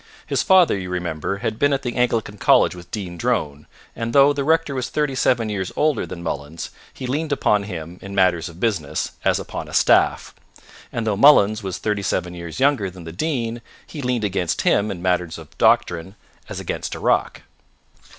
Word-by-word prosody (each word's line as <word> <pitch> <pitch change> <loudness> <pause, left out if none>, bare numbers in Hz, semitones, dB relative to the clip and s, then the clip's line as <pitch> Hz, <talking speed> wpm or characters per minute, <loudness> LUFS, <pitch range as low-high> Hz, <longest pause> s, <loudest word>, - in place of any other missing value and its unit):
His - - 0
father, 185 - +5
you 95 -2 -5
remember, 90 0 -3
had 110 +3 -3
been 145 0 +3
at 135 - -1
the 120 - -3
Anglican 115 -4 0
college - - +4
with 90 -1 -12
Dean 90 -5 -5
Drone, 75 -2 -1 0.3
and 115 0 -4
though 140 +1 +6
the 140 -1 -2
rector 160 0 +2
was 130 -2 -3
thirty 150 -2 -1
seven 125 -3 +1
years 100 -3 -3
older 150 -1 +1
than 85 - -8
Mullins, 75 0 -5 0.2
he 130 - -8
leaned 150 +5 -2
upon 105 -7 +2
him, 85 -2 -7
in 100 0 -8
matters 90 -3 +2
of 85 +1 -14
business, 100 -11 -1
as - - +3
upon - - -6
a - - -7
staff; - - +3 0.6
and 115 - -3
though 110 -2 +1
Mullins 110 -4 +6
was 95 -3 -4
thirty 105 -2 -1
seven 90 -1 -2
years 85 +1 -7
younger 135 -8 +2
than 90 -1 -12
the 80 - -8
Dean, 120 - -2 0.2
he 150 - -8
leaned 125 -3 -1
against 95 -4 -1
him, 105 +1 +2
in 90 -3 -6
matters 90 -3 0
of - - -13
doctrine, 90 +3 +2 0.3
as - - -5
against - - -4
a - - -7
rock. - - 0
105 Hz, 195 wpm, -21 LUFS, 90-130 Hz, 0.6 s, though